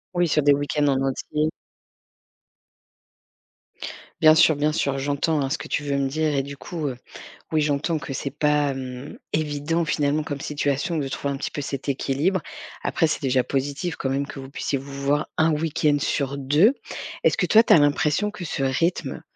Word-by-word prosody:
Oui, 175 -2 +2
sur 150 -1 +2
des 145 -1 +6
week-ends 145 +1 0
en 135 -1 +2
entier. 150 +3 -1 2.7
Bien 155 0 +8
sûr, 160 -1 +5
bien 150 +1 +1
sûr, 140 -3 0
j'entends, 145 +3 0
hein, 135 - -1
ce 155 - 0
que - - -8
tu 150 - -1
veux 140 -1 -1
me 135 -1 +1
dire 155 +2 0
et 140 - +2
du 140 +1 -7
coup, 155 +1 -5
heu, 130 - -3 0.6
oui, 155 - +3
j'entends 150 +3 0
que 145 - -7
c'est 140 +1 -3
pas, 145 0 +1
hem, 130 +1 -7
évident, 155 +2 0
finalement, 150 0 +1
comme 145 -2 -5
situation, 145 +3 -1
de 140 -3 -1
trouver 140 +1 -3
un - - -4
petit - - -3
peu 145 - -5
cet 140 0 -5
équilibre. 140 +7 0 0.4
Après, 165 - +2
c'est 155 - -2
déjà 130 -2 +2
positif 145 +6 -2
quand 135 - -3
même 140 +1 -1
que 135 - -8
vous 135 - -9
puissiez 140 0 -2
vous 140 +1 -9
voir 145 +2 +1
1 160 0 +3
week-end 150 -1 +1
sur 140 0 -1
2. 150 - +4 0.5
Est-ce - - +3
que - - +2
toi, 225 +1 +6
tu - - 0
as - - +9
l'impression 150 +6 +2
que 185 - -8
ce 145 -4 -3
rythme 165 +7 0
145 Hz, 195 wpm, -24 LUFS, 140-155 Hz, 2.7 s, as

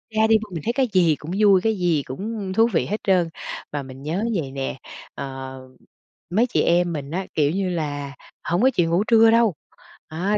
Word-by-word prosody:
ra 220 0 +4
đi 220 0 +5 0.2
mình 160 -4 -5
thấy 235 - 0
cái 260 0 +1
gì 170 -5 +4
cũng 155 +4 -9
vui, 200 -3 +5
cái 220 +2 +1
gì 170 -5 +1
cũng 200 - -5
thú 225 +4 +4
vị - - +2
hết 210 - -2
trơn. 180 -4 +2 0.4
Mà 145 -1 -3
mình 130 0 -11
nhớ 165 +8 -2
vậy 145 -7 -2
nè, 135 0 -4 0.4
ờ, 135 -1 -7 0.7
mấy 225 +8 +2
chị - - +1
em 175 0 +2
mình 145 -1 -5
á, 185 +3 -2
kiểu 145 -1 +2
như 190 +1 -1
là, 145 -5 -3 0.3
hổng 175 +5 0
có 260 - +5
chịu 170 -2 +1
ngủ 175 +4 +2
trưa 225 -1 +6
đâu, 230 -5 +3 0.5
à, 185 +7 -1
175 Hz, 210 wpm, -22 LUFS, 145-210 Hz, 0.7 s, trưa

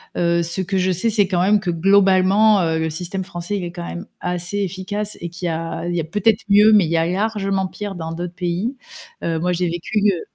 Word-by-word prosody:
Heu, 170 0 +1
ce 170 +3 -3
que 190 +1 -2
je 185 0 +2
sais, 185 +6 0
c'est 205 -3 +3
quand 180 -2 0
même 205 +3 +4
que 190 -3 -2
globalement, 195 +3 +4
heu, 165 -2 0
le 160 0 -1
système 180 +4 -4
français, 180 +1 -4
il 190 - -4
est 175 - -5
quand 175 0 -7
même 175 +4 -6
assez 180 +2 -3
efficace 200 +2 -3
et 170 - -4
qu'il 175 +1 -5
y - - 0
a 165 +1 -4
il 175 - -2
y - - 0
a - - -1
peut-être 210 +7 +1
mieux, 210 +2 +6
mais 210 -4 +6
il 160 - -4
y 165 - +2
a 165 - +2
largement 195 0 -1
pire 205 +1 -6
dans 165 -2 -5
d'autres 175 +1 -5
pays. 185 +9 -2 0.5
Heu, 165 -1 -1
moi 180 +2 0
j'ai 180 +1 0
vécu, 175 +5 -3 0.2
heu 175 - -4
180 Hz, 250 wpm, -20 LUFS, 170-200 Hz, 0.5 s, mieux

